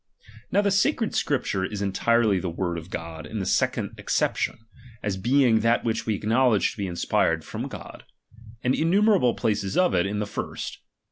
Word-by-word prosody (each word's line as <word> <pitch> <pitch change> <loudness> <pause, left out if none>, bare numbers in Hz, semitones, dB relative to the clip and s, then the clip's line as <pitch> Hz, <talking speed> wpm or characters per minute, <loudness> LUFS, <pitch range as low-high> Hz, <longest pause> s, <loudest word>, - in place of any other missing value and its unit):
Now 200 - +4
the 200 - +2
sacred 220 +3 +1
Scripture 115 -9 0
is 100 +1 -3
entirely 105 +1 +2
the 90 - -3
word 85 0 -2
of 80 +2 -12
God 80 -2 -6
in 110 - -6
this 95 -3 0
second - - 0
acception, - - 0 0.5
as 105 -2 -1
being 120 +3 +3
that 115 +2 +2
which 115 -1 -2
we 110 - +1
acknowledge 115 +1 +2
to - - -14
be 100 -2 -2
inspired 80 -2 0
from - - -5
God; - - -10 0.6
and 125 - +2
innumerable 180 - +3
places 105 -4 -1
of 180 -1 +3
it, 90 +1 +2
in 105 +1 -3
the 105 - -1
first. - - -5
110 Hz, 180 wpm, -25 LUFS, 95-130 Hz, 0.6 s, Now